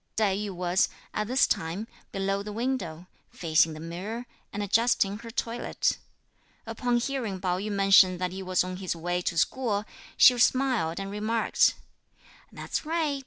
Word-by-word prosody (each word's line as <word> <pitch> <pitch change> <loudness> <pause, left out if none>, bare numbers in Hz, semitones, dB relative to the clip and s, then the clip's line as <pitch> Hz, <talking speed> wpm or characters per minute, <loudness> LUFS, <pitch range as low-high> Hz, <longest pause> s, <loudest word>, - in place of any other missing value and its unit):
Tai 205 -3 +2
yü 205 +1 -3
was, 180 0 +1 0.2
at 210 0 -2
this 255 +3 +4
time, 165 +7 -2 0.3
below 195 0 -1
the 210 +1 -6
window, 210 -8 -3 0.2
facing 160 -1 +2
the 155 - -9
mirror, 190 +9 -6 0.3
and 205 - -3
adjusting 205 -1 +2
her 230 0 -9
toilette. 230 0 -1 0.7
Upon 240 +2 0
hearing 240 -6 -2
Pao 180 -1 -1
yü 210 +2 -4
mention 195 -2 +5
that 180 0 -2
he 190 +1 -6
was 185 -1 +1
on 185 0 -5
his 185 -2 -3
way 175 +2 -2
to 175 - -2
school, 210 +2 0 0.3
she 250 - +8
smiled 245 -11 +2
and 195 0 -5
remarked, 215 +2 +2 0.8
"That's - - -4
right! 310 -3 -1
200 Hz, 160 wpm, -27 LUFS, 180-230 Hz, 0.8 s, she